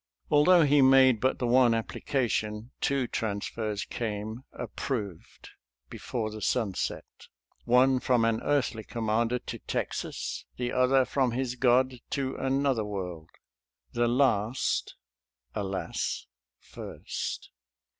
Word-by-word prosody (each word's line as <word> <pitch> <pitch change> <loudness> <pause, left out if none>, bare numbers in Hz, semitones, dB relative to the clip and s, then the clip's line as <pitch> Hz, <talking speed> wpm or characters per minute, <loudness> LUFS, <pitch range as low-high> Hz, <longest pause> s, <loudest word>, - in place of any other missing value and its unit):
Although 165 +4 +6
he 145 -1 +5
made 130 -3 +6
but 130 - +2
the 125 - -2
one 120 0 +5
appli 115 -1 -4
cation, 110 -3 -1
two 135 -2 +1
transfers 105 -1 -3
came 110 +1 -4
" - - -53
approved 105 - -5 0.2
" 60 0 -51
before 110 -3 -4
the 110 0 -8
sun 110 -2 0
set - - -3 0.4
— - - -41
one 130 +2 +4
from 125 -3 +2
an 115 -1 +1
earthly 130 -6 0
commander 115 +1 0
to - - -7
Texas, - - -4
the 125 -1 -2
other 130 +1 +3
from 130 -3 0
his 125 0 -1
God 125 0 +2
to 135 -2 -2
another 135 -3 +1
world 90 -6 -5 0.4
— - - -51
the 120 0 +2
last, 120 -2 +1 0.6
alas! 95 -2 -3 0.3
first. - - -6
120 Hz, 130 wpm, -28 LUFS, 110-130 Hz, 0.6 s, Although